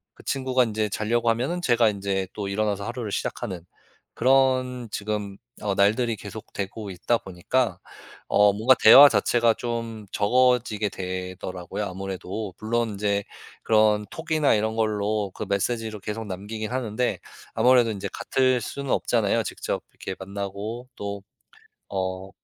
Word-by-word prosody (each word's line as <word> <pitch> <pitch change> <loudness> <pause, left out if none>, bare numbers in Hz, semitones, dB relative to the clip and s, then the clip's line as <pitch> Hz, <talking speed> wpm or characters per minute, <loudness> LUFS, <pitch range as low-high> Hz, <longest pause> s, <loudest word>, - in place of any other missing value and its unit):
그 - - -16
친구가 130 -2 +1
인제 110 -1 -1
자려고 115 +4 0
하면은 130 +10 0
제가 120 -7 +4
인제 100 -2 -2
또 105 -2 -4
일어나서 100 0 -1
하루를 115 -2 -4
시작하는 95 -5 -4 0.5
그런 130 -1 +2
지금 100 -1 -3 0.2
어 100 -2 -1
날들이 110 +4 +2
계속되고 105 0 -6
있다 105 +6 0
보니까 95 +2 -1 0.5
어 105 0 +5
뭔가 110 +6 +5
대화 135 +6 +11
자체가 115 +2 +3
좀 115 -3 -4
적어지게 115 -1 +2
되더라고요 90 +1 -5
아무래도. 95 +1 -5
물론 115 +1 0
인제 100 0 0 0.4
그런 110 -1 +3
톡이나 155 -3 +1
이런 110 +1 0
걸로 105 -2 0
그 110 - -5
메시지를 110 +1 -1
계속 110 +2 -4
남기긴 105 +3 -5
하는데 125 -1 -1 0.3
아무래도 125 -2 +4
인제 100 -3 -4
같을 130 -1 +1
수는 140 +4 -5
없잖아요. 115 -1 +1
직접 - - -4
이렇게 95 - -6
만나고 100 +5 -5
또 100 -1 -5 0.7
어 95 0 -3
110 Hz, 315 characters per minute, -25 LUFS, 100-120 Hz, 0.7 s, 대화